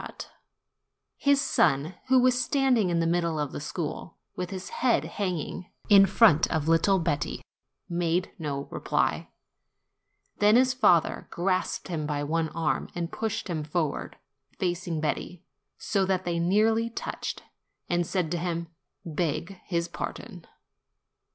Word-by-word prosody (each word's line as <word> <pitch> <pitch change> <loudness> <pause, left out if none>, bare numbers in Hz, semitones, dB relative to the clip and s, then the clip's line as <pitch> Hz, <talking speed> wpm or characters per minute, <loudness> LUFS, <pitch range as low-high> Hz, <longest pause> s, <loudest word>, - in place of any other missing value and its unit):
THE - - -5
CHARCOAL - - -15
MAN - - -33 1.0
29 285 - +3
His 280 -1 +4
son, 150 - +2
who 260 0 +5
was 250 0 +3
standing 255 -8 +2
in 170 -1 +1
the 165 - +1
middle 170 -2 0
of 145 -2 -2
the - - -6
school, 160 +2 -5 0.2
with 180 -1 -4
his 190 -1 -6
head 250 -2 +1
hanging, 180 -2 -4 0.2
in 195 -2 +8
front 190 -10 +5
of 160 -2 0
little 165 +4 +4
Betti, 165 -5 -2 0.4
made 175 +1 0
no 140 -3 -3
reply. - - -1 1.1
Then 210 +1 +5
his 255 +1 +4
father 205 -10 +3
grasped 185 +1 -1
him 155 -4 -2
by 145 -1 -2
one 160 +2 0
arm 160 0 -1
and 170 -1 -3
pushed 225 -1 -3
him 165 -4 -2
forward, 150 -1 -2 0.4
facing 175 -3 -2
Betti, 165 +3 -3 0.3
so 195 -2 0
that 185 -1 0
they 170 -1 -1
nearly 220 +6 +2
touched, 230 - -5 0.4
and 175 -1 0
said 180 -5 -1
to 175 - -1
him, 170 -1 -3 0.4
"Beg 165 +2 -2
his 170 -2 -1
pardon." 170 - -7
175 Hz, 150 wpm, -27 LUFS, 160-195 Hz, 1.1 s, in